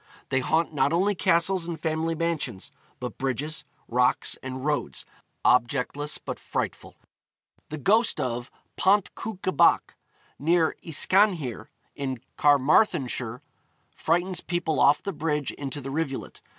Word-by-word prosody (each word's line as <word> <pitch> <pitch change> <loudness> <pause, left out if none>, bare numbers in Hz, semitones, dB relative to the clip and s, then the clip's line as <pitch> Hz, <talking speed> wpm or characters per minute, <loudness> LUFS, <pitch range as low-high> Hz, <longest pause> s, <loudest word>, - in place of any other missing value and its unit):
They 130 - +2
haunt 160 +5 +1
not 140 0 +2
only 190 +5 +2
castles 180 -1 +2
and 170 -2 -4
family 160 +1 -1
mansions, 155 - -2 0.3
but 125 - -6
bridges, 140 +4 -2 0.2
rocks, 125 +1 +2
and 130 +1 -6
roads, 150 -1 -1 0.4
objectless 130 +4 +2
but - - -6
frightful. - - -4 0.7
The 155 - -5
ghost 215 - +3
of 120 -2 -2 0.3
Pont 200 +1 +3
Cwnca 195 -5 -4
Bach, - - +4 0.4
near 165 +2 +2
Yscanhir, 165 - +1 0.3
in 135 -3 -3 0.2
Carmarthenshire, 140 - +2 0.5
frightens 175 +3 0
people 165 -4 -1
off 140 +1 +5
the 200 - -3
bridge 150 -3 -1
into 140 0 -6
the 135 0 -6
rivulet. 140 -2 -4
150 Hz, 125 wpm, -26 LUFS, 130-170 Hz, 0.7 s, off